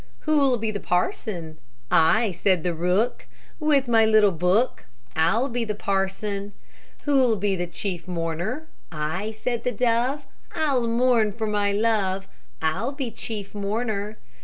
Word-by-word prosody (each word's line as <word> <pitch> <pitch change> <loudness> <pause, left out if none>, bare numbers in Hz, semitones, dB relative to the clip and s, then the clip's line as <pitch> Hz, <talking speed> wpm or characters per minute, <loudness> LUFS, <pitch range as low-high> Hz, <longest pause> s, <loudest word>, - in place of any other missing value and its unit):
Who'll 280 -5 +3
be 220 -1 -2
the 205 - -4
parson? 180 - -2 0.3
"I," 215 +7 +4
said 180 -1 +1
the 175 - 0
rook, 180 +8 0 0.3
"With 295 -4 +2
my 225 -2 +5
little 215 -2 +5
book, 180 +8 +1 0.3
I'll 225 +11 +2
be 245 -2 -2
the 215 -2 -3
parson." 200 +1 -2 0.5
Who'll 265 -6 +3
be 195 -3 -1
chief 175 0 -3
mourner? 175 - -3 0.3
"I," 160 +6 -2
said 230 +2 -3
the 250 - 0
dove, 245 +5 +1 0.3
"I 300 -3 +1
mourn 235 -2 +2
for 220 +1 -3
my 205 -1 +1
love, 200 -3 +1 0.4
I'll 160 - 0
be 270 -4 -4
chief 210 -4 -5
mourner." 210 0 -2
215 Hz, 135 wpm, -24 LUFS, 190-240 Hz, 0.5 s, my